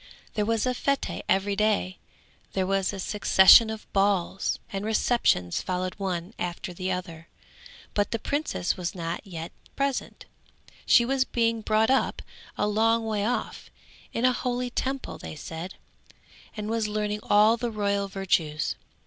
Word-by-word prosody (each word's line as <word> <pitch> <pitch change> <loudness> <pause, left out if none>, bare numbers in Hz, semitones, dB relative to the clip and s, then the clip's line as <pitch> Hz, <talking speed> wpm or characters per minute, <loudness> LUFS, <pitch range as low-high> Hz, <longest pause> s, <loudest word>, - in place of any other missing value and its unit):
There 210 -1 -1
was 225 0 +1
a - - +1
fête 280 +2 -1
every 195 +1 +2
day, 205 -3 0 0.5
there 190 -1 0
was 195 0 +1
a 200 - -7
succession 205 +2 +6
of 220 -1 -6
balls, 195 -1 +1 0.2
and 195 0 -3
receptions 215 - +1
followed 185 0 -2
one 185 0 -3
after 175 +1 -4
the 185 +1 -3
other, 170 -3 -5 0.7
but 205 -1 +1
the 230 - -1
princess 285 - -1
was 180 -1 -4
not 170 -1 -4
yet 165 -3 -6 0.2
present; 275 -1 -2 0.6
she 235 - +6
was 265 +1 +2
being 230 -3 0
brought 220 +2 +2
up 265 - +1 0.3
a 210 - +1
long 225 +2 +2
way 215 -2 -1
off, 240 +4 -3 0.4
in 235 - 0
a 255 - +4
holy 245 0 -2
Temple 265 +2 -3
they - - -8
said, 165 +4 -7 0.8
and 210 0 -4
was 225 -1 0
learning 210 0 -2
all 210 +2 +5
the 240 0 -3
royal 200 -2 -1
virtues. 170 -6 0
205 Hz, 150 wpm, -26 LUFS, 185-230 Hz, 0.8 s, succession